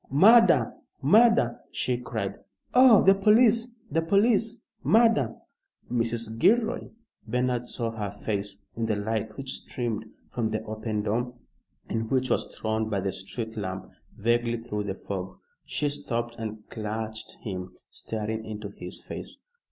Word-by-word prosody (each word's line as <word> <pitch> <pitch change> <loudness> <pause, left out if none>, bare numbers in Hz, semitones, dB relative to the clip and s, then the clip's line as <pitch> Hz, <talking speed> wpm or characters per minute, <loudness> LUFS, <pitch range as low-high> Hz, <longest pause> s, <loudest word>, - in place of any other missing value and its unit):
Murder! 220 - +6 0.3
Murder!" 225 - +5
she 125 - 0
cried. 115 -5 -4 0.3
"Oh, 250 -4 +8
the 195 - +7
police 225 +4 +4 0.2
the 165 +3 +2
police! 215 +6 +2 0.2
Murder!" 220 - +4 0.6
"Mrs. 115 -1 0
Gilroy!" 230 +5 +3 0.4
Bernard 125 +1 0
saw 115 -2 -2
her 105 -3 -4
face 100 -1 -4
in 115 0 -1
the 110 - +1
light 110 +1 -2
which 135 -1 -2
streamed 115 -3 -4 0.3
from 115 -3 -1
the 110 0 -2
open 110 -1 -3
door, 120 +4 -1 0.5
and 115 0 -2
which 130 -1 +1
was - - +1
thrown 110 0 -1
by 100 -2 0
the 95 0 -1
street 110 +4 -5
lamp 95 -3 -5 0.3
vaguely 120 +2 +1
through 105 -3 -4
the 95 -2 -3
fog. 95 -2 -6 0.3
She 150 - -1
stopped 120 -4 -3
and 110 -1 -6
clutched 110 0 -4
him, 90 -3 -5 0.2
staring 110 0 -4
into 105 -1 -6
his - - -9
face. - - -7
115 Hz, 140 wpm, -27 LUFS, 110-135 Hz, 0.6 s, Oh